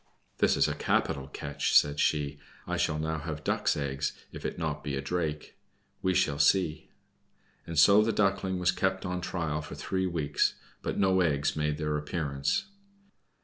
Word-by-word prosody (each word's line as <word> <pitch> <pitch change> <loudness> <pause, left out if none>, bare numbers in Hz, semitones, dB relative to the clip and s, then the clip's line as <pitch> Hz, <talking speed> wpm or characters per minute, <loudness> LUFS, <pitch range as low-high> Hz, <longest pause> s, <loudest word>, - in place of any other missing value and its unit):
"This - - +3
is - - +4
a - - -1
capital 70 -1 0
catch," 70 0 -2
said 75 0 +3
she, 75 -2 +1 0.3
"I 90 - -2
shall 85 -3 0
now 80 +1 -2
have 75 0 -5
Duck's - - +1
eggs, 70 0 -2 0.2
if - - -9
it - - -2
be - - -10
not 75 -2 -3
a 70 -2 -1
Drake. 75 +1 -3 0.4
We 95 0 +1
shall 75 -6 +2
see." 80 0 +2 0.8
And 85 -1 -5
so 100 +7 +7
the 110 +1 +2
Duckling 95 -3 +1
was 90 0 +2
kept 95 0 -1
on 90 0 -2
trial 80 -4 -2
for 80 - -8
three 95 0 -1
weeks, 75 -5 0 0.3
but - - -3
no 95 -1 +3
eggs 75 -4 +1
made 75 -1 0
their 75 0 -1
appearance. 70 - -1
80 Hz, 175 wpm, -29 LUFS, 75-90 Hz, 0.8 s, so